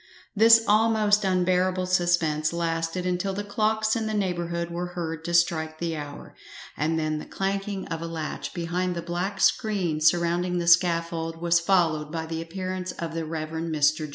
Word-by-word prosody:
This 225 +2 +7
almost 215 -1 +3
unbearable 185 0 +1
suspense 175 -4 +1
lasted 165 +1 -2
until 180 +2 -1
the 205 - -3
clocks 215 +1 0
in 225 -1 -2
the 215 - -2
neighbourhood 170 -3 -2
were 175 +1 -4
heard 165 -2 -4
to 170 - -3
strike 160 -2 +1
the 165 0 -3
hour, 145 -1 -8 0.4
and 160 +3 0
then 155 -1 -1
the - - -8
clanking 195 0 -3
of 165 0 -4
a 165 - -4
latch 160 -2 -5
behind 175 +1 -2
the 170 - -4
black 175 +3 -3
screen 185 -8 +1
surrounding 175 +2 +2
the 170 - -1
scaffold 170 -1 +2
was 170 0 +3
followed 165 -4 +1
by 160 -1 -3
the 160 0 -4
appearance 185 +2 -5
of 165 -1 -5
the 165 -1 -3
Rev. 155 0 -4
Mr. 155 -1 0
170 Hz, 170 wpm, -25 LUFS, 165-185 Hz, 0.4 s, This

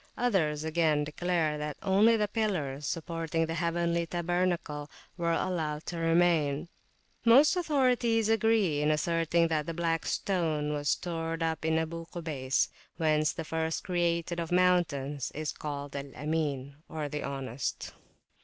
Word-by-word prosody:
Others, 160 -11 +1
again, 160 -2 +2
declare 155 0 -1
that 150 0 -4
only 205 +4 +5
the 210 -1 +1
pillars 165 - -2
supporting 165 -1 -1
the 165 - -3
heavenly 170 0 0
tabernacle 175 -3 -1 0.3
were 170 -1 0
allowed 160 -4 -1
to 170 - -4
remain. 165 -2 +2 0.5
Most 260 +9 +6
authorities 250 - +2
agree 220 -8 +2
in 150 - +2
asserting 165 +2 +2
that 155 -2 0
the 165 - -3
Black 165 -1 0
Stone 155 -6 0
was 145 0 -1
stored 165 -1 -1
up 160 -1 -1
in 160 0 +2
Abu 165 +1 -3
Kubays, 145 -6 -1 0.3
whence 155 -2 +2
that 165 - -5
first 160 0 -2
created 170 -1 0
of 165 0 -4
mountains 155 -7 +1
is 155 +1 -2
called 145 -2 -6
Al 140 0 -5
Amin, 140 -2 -2
the 150 -1 -4
Honest. 135 -3 -4
165 Hz, 135 wpm, -30 LUFS, 150-175 Hz, 0.5 s, Most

